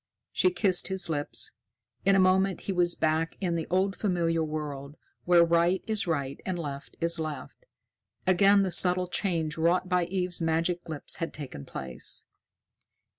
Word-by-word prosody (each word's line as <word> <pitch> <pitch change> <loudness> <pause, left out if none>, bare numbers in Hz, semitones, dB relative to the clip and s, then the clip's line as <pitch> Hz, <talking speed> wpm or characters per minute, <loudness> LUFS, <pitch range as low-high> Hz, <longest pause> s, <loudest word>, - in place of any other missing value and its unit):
She 185 - +3
kissed 180 0 +3
his 190 -2 0
lips. 145 -2 -1 0.5
In 195 0 +5
a - - +4
moment, 190 +1 +3
he 195 - -3
was 175 -1 +2
back 160 +1 0
in 180 -3 -1
the 165 -1 -2
old 190 +3 +1
familiar 170 -5 0
world, 150 -2 -5 0.3
where 175 -1 +6
right 170 +2 +2
is 215 -4 -2
right 140 -5 -2
and 185 -2 -3
left 140 -4 -7
is 170 0 +2
left. 155 - -6 0.6
Again 195 +2 +5
the 190 - -1
subtle 180 +1 +4
change 165 -5 -2
wrought 175 +3 +2
by 180 -1 +2
Eve's 180 -1 -1
magic 165 +2 -1
lips 155 -3 -3
had 165 - -4
taken 130 - -8
place. 65 -1 -6
175 Hz, 160 wpm, -28 LUFS, 160-185 Hz, 0.6 s, where